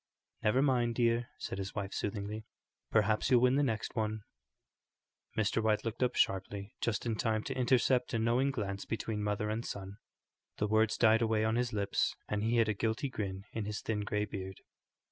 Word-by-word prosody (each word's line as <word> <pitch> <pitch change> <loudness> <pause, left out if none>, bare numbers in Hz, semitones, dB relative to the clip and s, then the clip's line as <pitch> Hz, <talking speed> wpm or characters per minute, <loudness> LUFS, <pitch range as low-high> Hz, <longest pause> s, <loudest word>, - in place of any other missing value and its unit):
"Never 125 +6 +3
mind, 120 -4 +2
dear," 120 0 +2
said - - -5
his 95 0 -5
wife, 100 -2 -3
soothingly; 105 +1 -3 0.5
"perhaps 110 0 +2
you'll 125 -2 +6
win 125 0 +5
the 140 - +3
next 115 -5 -1
one." 110 -2 -1 1.1
Mr. 110 +1 +2
White 110 0 +1
looked 115 +1 -3
up 125 - +2
sharply, 100 +1 0
just 115 -2 -1
in 115 -2 0
time 110 -1 0
to 135 - -4
intercept 125 0 +3
a - - +2
knowing 120 +4 +2
glance 100 -7 -3
between 110 -1 -3
mother 105 +1 -1
and 110 +2 -2
son. 100 -2 -6 0.6
The 105 - +1
words 110 +1 +2
died 110 0 +5
away 110 -1 +2
on 110 +1 +1
his 120 0 0
lips, 100 -2 0
and 105 -1 -1
he 115 +2 +1
hid 115 -2 +4
a 110 - +1
guilty 110 +6 -1
grin 95 -5 -4
in 110 -2 -2
his 105 0 -3
thin 110 -2 -1
grey 105 0 -1
beard. 95 -2 -7
110 Hz, 190 wpm, -33 LUFS, 105-120 Hz, 1.1 s, you'll